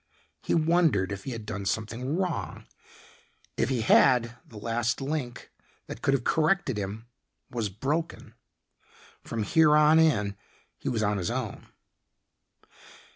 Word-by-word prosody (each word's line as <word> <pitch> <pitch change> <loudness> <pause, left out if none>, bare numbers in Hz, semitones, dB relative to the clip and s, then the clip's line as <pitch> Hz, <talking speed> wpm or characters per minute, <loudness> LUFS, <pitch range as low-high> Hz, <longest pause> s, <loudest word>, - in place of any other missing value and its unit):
He - - 0
wondered 160 - +2
if 100 -1 -6
he 135 - -4
had 115 -3 -6
done 100 -2 -5
something 120 - -2
wrong. 185 -3 -3 0.9
If - - 0
he 130 -4 0
had, 120 +1 +4
the 110 - -13
last 115 +2 -1
link, 135 -3 -4 0.3
that 110 - -8
could 135 - +2
have 125 - -2
corrected 160 - +1
him 105 +3 -5 0.5
was 115 -4 -2
broken. 145 - -3 0.9
From 115 -2 -3
here 150 +7 +4
on 150 +1 +6
in 105 -11 +2 0.4
he - - -3
was 110 -3 -1
on 105 -1 0
his 90 - -2
own. 120 -3 -4
120 Hz, 135 wpm, -27 LUFS, 110-150 Hz, 0.9 s, on